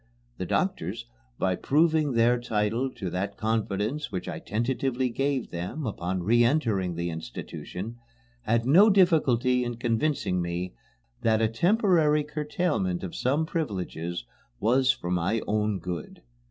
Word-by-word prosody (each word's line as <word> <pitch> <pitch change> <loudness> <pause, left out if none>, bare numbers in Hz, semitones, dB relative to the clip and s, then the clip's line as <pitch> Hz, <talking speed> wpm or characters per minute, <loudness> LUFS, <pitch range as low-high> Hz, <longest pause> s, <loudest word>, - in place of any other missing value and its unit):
The - - -3
doctors, - - -1 0.3
by 95 -1 +1
proving 155 - +2
their 120 +1 +3
title 115 +2 0
to 95 -4 -4
that 100 +3 -3
confidence 110 +5 -1
which 90 -2 -4
I - - -4
tentatively 125 +2 -1
gave 135 0 -1
them 90 - -4
upon 95 -4 -2
re 120 +5 +4
entering 110 - +1
the 85 +1 -2
institution, 90 - -7 0.4
had 115 0 +1
no 180 - +7
difficulty 135 - +3
in 120 -1 -3
convincing 115 -5 0
me 85 +1 -3 0.5
that 110 -1 +3
a 110 - +3
temporary 165 - +3
curtailment 150 - -1
of 90 - -5
some 145 +5 +1
privileges 90 - -3 0.3
was 125 +4 +3
for 90 - -5
my 90 +6 +1
own 105 -1 0
good. 90 -6 -6
115 Hz, 135 wpm, -27 LUFS, 95-140 Hz, 0.5 s, no